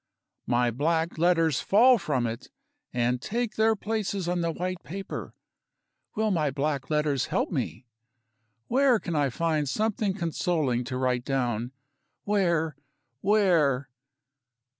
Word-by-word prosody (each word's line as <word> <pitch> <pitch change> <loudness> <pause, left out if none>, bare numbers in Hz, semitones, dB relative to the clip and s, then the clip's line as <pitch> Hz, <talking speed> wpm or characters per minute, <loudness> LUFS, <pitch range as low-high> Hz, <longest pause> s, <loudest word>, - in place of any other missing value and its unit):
My 120 0 +2
black 160 +6 0
letters 165 -5 +3
fall 240 +4 +5
from 140 -8 -1
it, 115 0 -5 0.4
and 125 0 0
take 235 0 -2
their 220 0 +3
places 205 -3 -2
on 175 0 0
the 170 - 0
white 180 +1 -4
paper. 195 +3 -7 0.8
Will 215 0 +1
my 155 -6 +1
black 140 0 -2
letters 150 -3 +1
help - - -1
me? - - -3 0.8
Where 260 -1 +3
can 170 -5 -4
I 145 -2 +2
find 155 0 0
something 215 +1 0
consoling 160 - 0
to 125 0 -4
write 125 -1 0
down? 125 -3 -1 0.5
Where? 170 -7 +1 0.4
Where? 165 -10 +2
160 Hz, 125 wpm, -27 LUFS, 135-195 Hz, 0.8 s, fall